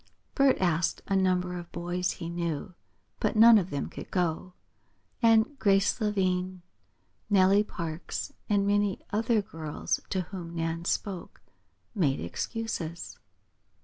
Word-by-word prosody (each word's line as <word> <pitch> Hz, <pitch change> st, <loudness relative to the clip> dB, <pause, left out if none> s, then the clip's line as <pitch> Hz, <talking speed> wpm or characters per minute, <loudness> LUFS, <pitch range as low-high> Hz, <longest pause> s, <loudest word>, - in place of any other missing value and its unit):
Bert 275 Hz, -2 st, +4 dB
asked 170 Hz, -2 st, +1 dB
a 195 Hz, -, 0 dB
number 180 Hz, -1 st, +1 dB
of 175 Hz, -1 st, -8 dB
boys 175 Hz, +1 st, -2 dB
he 165 Hz, -, -7 dB
knew, 170 Hz, 0 st, -3 dB, 0.5 s
but -, -, 0 dB
none 225 Hz, 0 st, +8 dB
of 185 Hz, -1 st, -4 dB
them 140 Hz, -4 st, -3 dB
could -, -, -9 dB
go, 180 Hz, 0 st, -1 dB, 0.7 s
and 230 Hz, +4 st, +4 dB
Grace 195 Hz, +2 st, +3 dB
Lavine, 185 Hz, -3 st, 0 dB, 0.7 s
Nellie 200 Hz, 0 st, +5 dB
Parks, 170 Hz, -5 st, -5 dB, 0.2 s
and 200 Hz, -1 st, +2 dB
many 205 Hz, -1 st, +1 dB
other 225 Hz, 0 st, +2 dB
girls 160 Hz, -7 st, -3 dB
to 190 Hz, -, 0 dB
whom 170 Hz, -1 st, -7 dB
Nan 165 Hz, 0 st, -2 dB
spoke, 190 Hz, -1 st, -3 dB, 0.5 s
made 150 Hz, -11 st, +1 dB
excuses. 170 Hz, -, -4 dB
185 Hz, 125 wpm, -28 LUFS, 170-205 Hz, 0.7 s, none